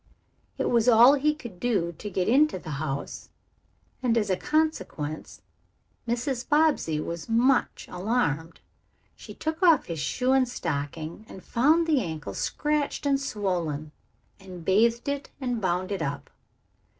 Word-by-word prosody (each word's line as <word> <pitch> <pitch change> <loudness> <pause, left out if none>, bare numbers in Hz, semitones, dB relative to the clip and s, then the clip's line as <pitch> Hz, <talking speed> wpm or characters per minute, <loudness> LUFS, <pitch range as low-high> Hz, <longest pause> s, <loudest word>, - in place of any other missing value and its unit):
It - - 0
was 235 0 +4
all 240 +3 +8
he 300 +2 +2
could 235 - -10
do 190 -8 0
to 210 - -5
get 185 -1 -1
into 280 -1 +4
the 170 -3 -8
house, 140 -3 -5 0.7
and 240 -2 +2
as 210 -3 +1
a - - +3
consequence 240 - -2 0.6
Mrs. 245 +2 -2
Bobbsey 295 - +2
was 170 +4 -5
much 245 +3 +2
alarmed. 170 -6 -2 0.5
She - - -11
took 315 +2 -4
off 335 -4 +5
his 165 -2 -5
shoe 250 - 0
and 265 -2 +3
stocking 160 - -4
and 190 - -11
found 310 +8 +3
the 305 -5 +2
ankle 160 -5 -5
scratched 300 -1 -1
and 275 -1 +2
swollen, 175 - -2 0.5
and 185 -3 -11
bathed 230 +6 +2
it 280 -1 -3
and 245 -4 -2
bound 185 +1 -1
it 195 -4 -2
up. 140 -2 -4
225 Hz, 145 wpm, -26 LUFS, 170-270 Hz, 0.7 s, all